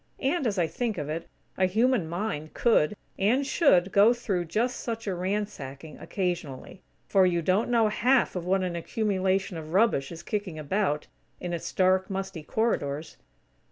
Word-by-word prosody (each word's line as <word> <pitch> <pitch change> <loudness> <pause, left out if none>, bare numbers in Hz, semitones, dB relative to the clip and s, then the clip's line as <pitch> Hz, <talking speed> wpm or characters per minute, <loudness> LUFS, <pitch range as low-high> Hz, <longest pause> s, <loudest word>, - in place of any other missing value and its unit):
And, 275 0 0
as 205 -3 -1
I 175 - +3
think 230 +3 -3
of 150 -2 -4
it, 165 +2 -4 0.3
a 185 - +4
human 220 -2 +2
mind 170 -4 -4
could, 210 -6 +3 0.2
and 240 +8 +2
should 195 - +3
go 205 +5 +6
through 195 -7 -2
just 235 +9 -1
such 230 -1 -4
a 195 - -1
ransacking, 175 -7 -4
occasionally; 175 -4 -4 0.3
for 190 -2 +4
you 170 -2 0
don't 190 +8 +2
know 230 -2 +4
half 245 +4 +2
of 180 - -2
what 185 +2 +1
an 180 -2 -2
accumulation 190 0 -1
of 160 0 -8
rubbish 195 -10 +3
is 165 - -8
kicking 200 -6 -3
about, 155 0 -1 0.3
in 175 -1 -4
its 170 - -4
dark, 185 0 +2
musty 195 -3 -4
corridors. 155 -6 -2
190 Hz, 165 wpm, -27 LUFS, 170-220 Hz, 0.3 s, go